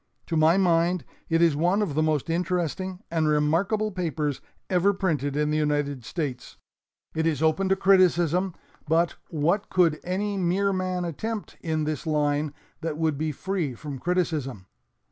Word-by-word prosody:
To 165 Hz, -, -3 dB
my 160 Hz, +3 st, +5 dB
mind 175 Hz, -3 st, +2 dB, 0.2 s
it 165 Hz, +1 st, +3 dB
is 165 Hz, -4 st, +4 dB
one 175 Hz, +7 st, +2 dB
of 185 Hz, -, -2 dB
the 155 Hz, -, +1 dB
most 155 Hz, -2 st, +1 dB
interesting 180 Hz, +2 st, -2 dB
and 160 Hz, -2 st, +1 dB
remarkable 170 Hz, +9 st, +1 dB
papers 160 Hz, -6 st, -2 dB, 0.3 s
ever 190 Hz, +2 st, +2 dB
printed 150 Hz, -7 st, -1 dB
in 150 Hz, 0 st, +1 dB
the 155 Hz, -, +1 dB
United 145 Hz, -3 st, 0 dB
States. 135 Hz, -6 st, -4 dB, 0.6 s
It 160 Hz, 0 st, 0 dB
is 155 Hz, -2 st, 0 dB
open 175 Hz, +5 st, +2 dB
to 195 Hz, -, +4 dB
criticism, 180 Hz, -2 st, +3 dB, 0.3 s
but 165 Hz, +2 st, +2 dB
what 170 Hz, +6 st, 0 dB
could 170 Hz, -4 st, +3 dB
any 200 Hz, +2 st, -2 dB
mere 190 Hz, +3 st, +1 dB
man 185 Hz, -1 st, -1 dB
attempt 215 Hz, +6 st, -4 dB
in 160 Hz, -2 st, -1 dB
this 155 Hz, 0 st, -3 dB
line 150 Hz, -1 st, +1 dB, 0.3 s
that 160 Hz, -2 st, -3 dB
would 160 Hz, -2 st, +1 dB
be 155 Hz, +2 st, -1 dB
free 170 Hz, -4 st, -2 dB
from 140 Hz, +1 st, -7 dB
criticism. 155 Hz, -, -1 dB
165 Hz, 160 wpm, -26 LUFS, 150-185 Hz, 0.6 s, my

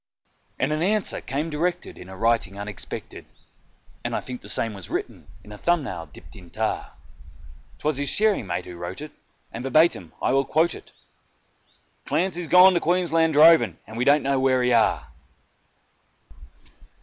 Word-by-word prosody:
And 135 Hz, -, -1 dB
an 155 Hz, -, -2 dB
answer 205 Hz, +3 st, +1 dB
came 145 Hz, +6 st, -3 dB
directed 175 Hz, +4 st, -2 dB
in 90 Hz, -, -12 dB
a 95 Hz, -, -10 dB
writing 115 Hz, -3 st, 0 dB
unexpected 100 Hz, -1 st, -7 dB, 0.8 s
(And -, -, -3 dB
I -, -, 0 dB
think 125 Hz, -1 st, -8 dB
the 100 Hz, -, -11 dB
same 110 Hz, 0 st, -1 dB
was 100 Hz, -4 st, -10 dB
written -, -, -5 dB, 0.2 s
with 105 Hz, -, -14 dB
a 105 Hz, -, -10 dB
thumb 175 Hz, -3 st, +1 dB
nail 85 Hz, -10 st, -6 dB
dipped 75 Hz, -, -15 dB
in 90 Hz, -, -14 dB
tar); -, -, -3 dB, 0.8 s
'Twas 150 Hz, -2 st, -2 dB
his 145 Hz, 0 st, 0 dB
shearing 210 Hz, -, +2 dB
mate 90 Hz, 0 st, -3 dB
who 90 Hz, -1 st, -10 dB
wrote 85 Hz, +7 st, -6 dB
it, 150 Hz, -, -8 dB, 0.4 s
and 115 Hz, -, -6 dB
verbatim 135 Hz, -, +2 dB
I 125 Hz, -, 0 dB
will 135 Hz, 0 st, +3 dB
quote 160 Hz, +4 st, +1 dB
it: -, -, -12 dB, 1.1 s
"Clancy's 175 Hz, -1 st, -1 dB
gone 180 Hz, +2 st, +7 dB
to 175 Hz, -, +2 dB
Queensland 165 Hz, -2 st, +1 dB
droving, 160 Hz, +2 st, +6 dB
and 110 Hz, -, -11 dB
we 120 Hz, -, -1 dB
don't 145 Hz, +2 st, +4 dB
know 135 Hz, 0 st, +1 dB
where 130 Hz, -1 st, +2 dB
he 125 Hz, 0 st, +2 dB
are." 115 Hz, -, +2 dB
135 Hz, 170 wpm, -24 LUFS, 105-165 Hz, 1.1 s, gone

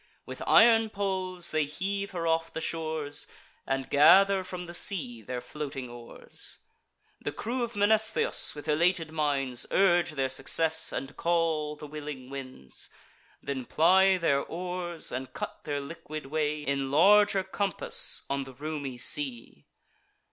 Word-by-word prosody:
With -, -, -8 dB
iron 225 Hz, -1 st, +6 dB
poles 185 Hz, -3 st, -2 dB
they 155 Hz, -1 st, +1 dB
heave 200 Hz, +6 st, -3 dB
her 170 Hz, -2 st, -4 dB
off 165 Hz, 0 st, +1 dB
the -, -, -4 dB
shores, 155 Hz, -3 st, -2 dB, 0.4 s
And 135 Hz, -1 st, -1 dB
gather 190 Hz, +6 st, +6 dB
from 180 Hz, -1 st, -7 dB
the 170 Hz, -, -9 dB
sea 155 Hz, -, -1 dB
their 125 Hz, +3 st, -5 dB
floating 135 Hz, -4 st, -6 dB
oars. 120 Hz, -1 st, -7 dB, 0.6 s
The -, -, -3 dB
crew 245 Hz, +3 st, -3 dB
of 235 Hz, -1 st, -3 dB
Mnestheus, 220 Hz, -1 st, +3 dB
with 145 Hz, +1 st, -9 dB
elated 165 Hz, +1 st, +2 dB
minds, 140 Hz, -5 st, 0 dB
Urge 175 Hz, -4 st, +3 dB
their 135 Hz, -2 st, 0 dB
success, 160 Hz, +5 st, 0 dB
and 135 Hz, +1 st, -5 dB
call 165 Hz, -3 st, 0 dB
the 150 Hz, -, -10 dB
willing 145 Hz, -3 st, -7 dB
winds; 130 Hz, -, -7 dB, 0.5 s
Then 135 Hz, -2 st, -3 dB
ply 190 Hz, +6 st, +4 dB
their 145 Hz, -5 st, +2 dB
oars, 175 Hz, -1 st, -4 dB
and 130 Hz, 0 st, -5 dB
cut -, -, -6 dB
their 145 Hz, -1 st, -2 dB
liquid 155 Hz, +1 st, -7 dB
way 150 Hz, +1 st, -1 dB
In 140 Hz, -1 st, -1 dB
larger 200 Hz, +6 st, +5 dB
compass 195 Hz, 0 st, -1 dB
on 140 Hz, 0 st, -1 dB
the 135 Hz, -1 st, -11 dB
roomy 145 Hz, -2 st, -5 dB
sea. 125 Hz, -1 st, -2 dB
155 Hz, 140 wpm, -29 LUFS, 140-185 Hz, 0.6 s, iron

